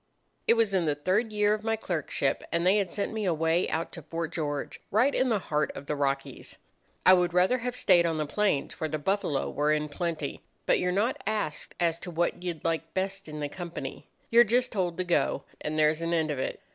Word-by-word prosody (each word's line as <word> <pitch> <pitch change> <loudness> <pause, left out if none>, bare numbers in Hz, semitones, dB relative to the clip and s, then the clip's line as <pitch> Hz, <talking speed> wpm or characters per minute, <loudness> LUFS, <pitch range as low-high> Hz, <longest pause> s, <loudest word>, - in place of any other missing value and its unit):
"It 230 - +6
was 225 -3 +2
in 185 -3 +2
the 150 - +1
third 190 +10 0
year 210 0 +3
of 215 0 -3
my 225 0 +1
clerkship, 160 -9 -1
and 170 +1 +1
they 190 +3 +5
had 195 -4 0
sent 205 +1 -2
me 220 -2 -2
away 165 0 +1
out 165 +1 -2
to 165 - -8
Fort 165 +2 -4
George, 145 -3 -3
right 245 +7 +3
in 255 - +2
the 225 - +3
heart 150 -5 -1
of 140 - -7
the 150 - -2
Rockies. 140 -1 -2 0.5
I 185 - +9
would 175 -1 +2
rather 185 +8 +4
have 245 +1 -3
stayed 175 -8 +4
on 165 -1 -1
the 155 - 0
plains, 195 -2 0
where 160 - -1
the 155 - -1
buffalo 155 -3 0
were 150 +1 +1
in 150 0 0
plenty; 160 -2 -3 0.2
but - - +3
you're 180 - +1
not 210 +7 0
asked 210 -9 -2
as 170 -1 +1
to 180 - -7
what 175 +1 -1
you'd 175 -3 -5
like 165 -1 -1
best 195 0 -2
in 150 0 -6
the 145 - -1
company. 170 +2 -7 0.2
You're 235 +1 +8
just 245 +3 +1
told 180 -5 -1
to 185 - 0
go, 175 -1 +1 0.2
and 155 +1 -3
there's 155 +1 +3
an 165 0 -1
end 160 -2 +1
of 140 - -3
it. - - -3
175 Hz, 230 wpm, -28 LUFS, 155-200 Hz, 0.5 s, I